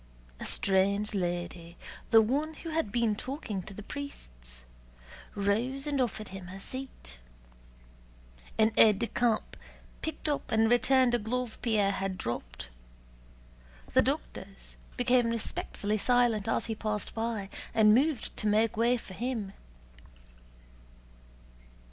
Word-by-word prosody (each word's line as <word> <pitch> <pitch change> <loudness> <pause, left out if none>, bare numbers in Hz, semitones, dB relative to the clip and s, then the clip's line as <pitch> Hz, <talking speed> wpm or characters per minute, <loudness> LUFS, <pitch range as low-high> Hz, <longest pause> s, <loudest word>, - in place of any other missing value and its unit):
A - - -5
strange 200 +2 +2
lady, 175 -2 -3 0.3
the 225 -1 +7
one 295 +8 -1
who 330 - -7
had 315 -10 -1
been 230 -2 +1
talking 250 - -4
to 195 - -10
the 210 - -8
priests, - - -8 0.7
rose 230 +8 0
and 285 -3 0
offered 215 -3 -2
him 190 -1 -8
her 190 +1 -8
seat; 195 - -8 1.4
an 220 0 +4
aide 215 -3 +7
de 235 - 0
camp 230 -1 0 0.5
picked 315 0 -4
up 295 -1 -2
and 220 +1 +3
returned 255 0 +4
a 240 - +3
glove 240 +2 -3
Pierre 215 -4 +2
had 195 -1 -2
dropped; 65 - -5 1.2
the - - +6
doctors - - -4 0.2
became 245 -1 +3
respectfully 215 -2 -2
silent 240 -3 +2
as - - +1
he 225 - -2
passed 215 -1 -3
by, 225 -3 -2 0.2
and 215 -2 +6
moved 270 0 +1
to 215 - 0
make 215 +2 +3
way 235 +3 +3
for 200 - -10
him. 225 -2 -3
220 Hz, 130 wpm, -30 LUFS, 195-245 Hz, 1.4 s, the